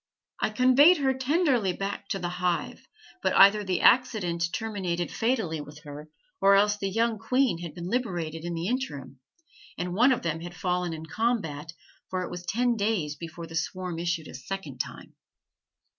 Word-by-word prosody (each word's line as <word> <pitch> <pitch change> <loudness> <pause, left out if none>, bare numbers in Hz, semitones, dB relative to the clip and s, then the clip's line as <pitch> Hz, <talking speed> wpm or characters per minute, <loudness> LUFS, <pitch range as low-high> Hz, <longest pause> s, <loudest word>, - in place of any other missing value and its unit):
I - - +1
conveyed 255 +9 +6
her 270 -2 +2
tenderly 260 - +1
back 200 +1 -4
to 195 - -2
the 175 -2 -3
hive, 180 -2 -1 0.3
but - - +1
either 200 +2 +7
the 185 -3 -1
accident 180 -9 +3
terminated 185 -5 -2
fatally 220 - -1
with 150 +1 -12
her 150 +1 -9 0.3
or 195 0 +6
else 205 +1 +4
the 195 -1 -3
young 225 +2 0
queen 255 -7 +1
had 170 -3 -7
been 175 0 -6
liberated 175 -9 -2
in 175 0 -3
the 165 +1 -3
interim, 145 - -4 0.6
and 180 0 -3
one 245 +8 +5
of 250 -1 0
them 165 0 -2
had 175 +1 -8
fallen 180 0 -1
in 160 0 -7
combat, 165 -7 -2 0.4
for 185 -1 -2
it - - -6
was 175 0 -6
ten 240 +2 +1
days 200 -9 -1
before 165 +1 -8
the 165 - -12
swarm 175 +1 -3
issued 170 -2 -2
a - - -10
second 140 0 -6
time. - - -6
185 Hz, 175 wpm, -27 LUFS, 165-225 Hz, 0.6 s, either